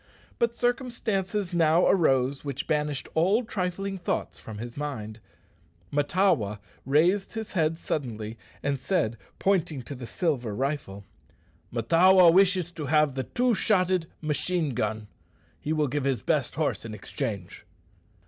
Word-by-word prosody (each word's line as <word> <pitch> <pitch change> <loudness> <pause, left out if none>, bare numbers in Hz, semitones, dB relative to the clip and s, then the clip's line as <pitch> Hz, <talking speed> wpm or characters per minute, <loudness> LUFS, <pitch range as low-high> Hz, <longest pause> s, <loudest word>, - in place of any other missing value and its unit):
But 235 -1 +1
circumstances 220 -7 -1
now 165 0 +4
arose 135 -6 +2
which 140 -1 -4
banished 150 -3 -1
all 190 +9 +3
trifling 195 -1 -3
thoughts 175 - -3
from 110 -2 -9
his 120 +2 -7
mind. 115 -7 -5 0.7
Mahtawa 145 - +2 0.3
raised 175 +8 +3
his 220 -1 -5
head 160 -3 +1
suddenly, 115 -9 -4 0.3
and 140 -1 0
said, 120 - 0 0.2
pointing 165 -8 +1
to 140 - -7
the 125 -3 -8
silver 125 - -1
rifle, 130 -7 -3 0.7
"Mahtawa 170 +9 +6
wishes 185 -2 +4
to 155 -5 -6
have 150 -1 +3
the 130 0 -3
two 250 0 +1
shotted 185 -5 +2 0.2
medicine 155 0 0
gun. 110 -2 -2 0.5
He 150 - -4
will 155 -2 +2
give 145 +1 -2
his 130 -7 0
best - - 0
horse - - -1
in 110 -2 -6
exchange." 105 - -5
155 Hz, 135 wpm, -27 LUFS, 130-185 Hz, 0.7 s, Mahtawa